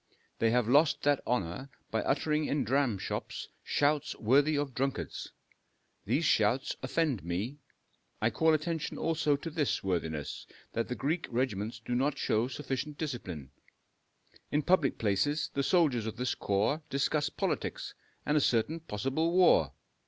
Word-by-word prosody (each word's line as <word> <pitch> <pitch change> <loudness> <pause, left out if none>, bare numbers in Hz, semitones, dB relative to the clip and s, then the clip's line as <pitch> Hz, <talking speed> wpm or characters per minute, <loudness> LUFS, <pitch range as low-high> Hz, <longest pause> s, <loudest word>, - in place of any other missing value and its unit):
They 115 - +3
have 120 -1 +2
lost 145 +5 +4
that 145 -1 +3
honor 120 +2 -1 0.2
by 110 - +1
uttering 150 +2 +1
in 145 0 0
dramshops 130 -7 -1
shouts 145 0 +1
worthy 140 +6 +3
of 145 -2 -2
drunkards. 135 +2 -3 0.7
These - - +1
shouts - - +2
offend 150 - 0
me. 100 - -3 0.6
I 110 +2 +2
call 160 +8 +3
attention 160 0 -3
also 155 -3 +1
to 160 +4 -6
this, 150 -3 0
worthiness, 80 -6 -3 0.3
that 115 - -1
the 125 - -3
Greek 160 +7 -1
regiments 115 -2 -2
do 125 - -2
not 135 +3 +1
show 110 +3 +1
sufficient 140 +2 -4
discipline. 95 - -5 1.0
In 150 +1 +1
public 170 -6 +3
places 140 +8 0
the 140 - 0
soldiers 140 - +2
of 110 - -4
this 125 +1 -1
corps 105 +10 0
discuss 145 +2 +1
politics - - -3 0.3
and 150 - +1
a 150 - +4
certain 130 +7 +1
possible 145 +4 -1
war. 180 0 +5
135 Hz, 145 wpm, -31 LUFS, 115-150 Hz, 1.0 s, war